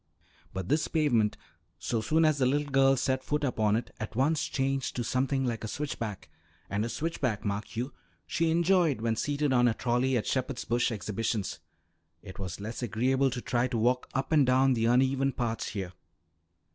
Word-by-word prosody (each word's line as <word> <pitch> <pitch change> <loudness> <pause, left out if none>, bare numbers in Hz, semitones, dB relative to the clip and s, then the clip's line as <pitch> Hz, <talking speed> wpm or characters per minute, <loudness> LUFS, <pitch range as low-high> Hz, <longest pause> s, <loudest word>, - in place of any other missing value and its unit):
But 95 -1 -5
this 150 +6 +1
pavement, 120 -10 +2 0.4
so 110 +7 -2
soon 160 +8 +2
as 155 -2 +2
the 130 - +3
little 145 +2 0
girl 135 0 +4
set 130 +1 0
foot 150 +2 -1
upon 110 -6 +1
it, 115 +1 -3
at 110 -1 -6
once 145 +4 +2
changed 135 0 -1
to 120 - -1
something 135 +3 0
like 115 -2 -2
a - - -3
switchback, 115 -6 -4 0.4
and 100 +2 0
a 115 - -2
switchback, 125 -5 -2
mark 100 +1 -3
you, 125 +5 -3 0.3
she 165 - 0
enjoyed 170 - +3
when 115 -1 0
seated 145 +4 0
on 125 -1 +4
a 115 - +1
trolley 125 +1 +1
at 110 - -2
Shepherd's 130 -1 -2
Bush 120 +1 +1
Exhibitions; 105 -1 -2 0.6
it 95 -1 -10
was 95 -2 -5
less 110 +5 -5
agreeable 130 +4 +1
to 125 -1 -4
try 120 0 +1
to 120 -2 -2
walk 125 +3 +1
up 135 +2 -1
and 155 -3 +5
down 130 +1 +4
the 115 -2 0
uneven 130 +3 +3
parts 115 -2 -2
here. 95 -4 -5
125 Hz, 185 wpm, -29 LUFS, 115-135 Hz, 0.6 s, and